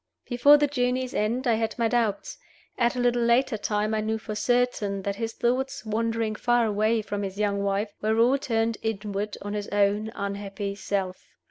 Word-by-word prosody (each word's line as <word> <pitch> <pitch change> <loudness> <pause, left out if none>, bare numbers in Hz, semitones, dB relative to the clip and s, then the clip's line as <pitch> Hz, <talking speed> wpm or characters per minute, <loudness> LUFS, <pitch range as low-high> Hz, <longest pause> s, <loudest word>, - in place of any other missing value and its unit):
Before 275 +4 +6
the 295 - +3
journey's 255 -2 -1
end 235 +5 0
I 240 - +3
had 220 0 -1
my 230 -1 +2
doubts; 225 -3 -1 0.4
at 235 0 +1
a - - -2
little 245 0 +2
later 235 +1 +3
time 210 0 -1
I 215 - +1
knew 220 +1 -1
for 215 0 -6
certain 210 -4 0
that 200 0 -2
his 225 0 -3
thoughts, 265 +2 -1
wandering 225 0 -1
far 240 +2 +2
away 215 +1 +1
from 205 -1 -4
his 195 -1 -5
young 200 -1 0
wife, 200 +1 -1
were 220 +1 +1
all 250 +4 +4
turned 225 -3 0
inward 210 -1 -3
on 205 0 -4
his 205 -1 -3
own 205 +2 +1
unhappy 200 0 -4
self. 195 -2 -3
220 Hz, 190 wpm, -26 LUFS, 205-240 Hz, 0.4 s, Before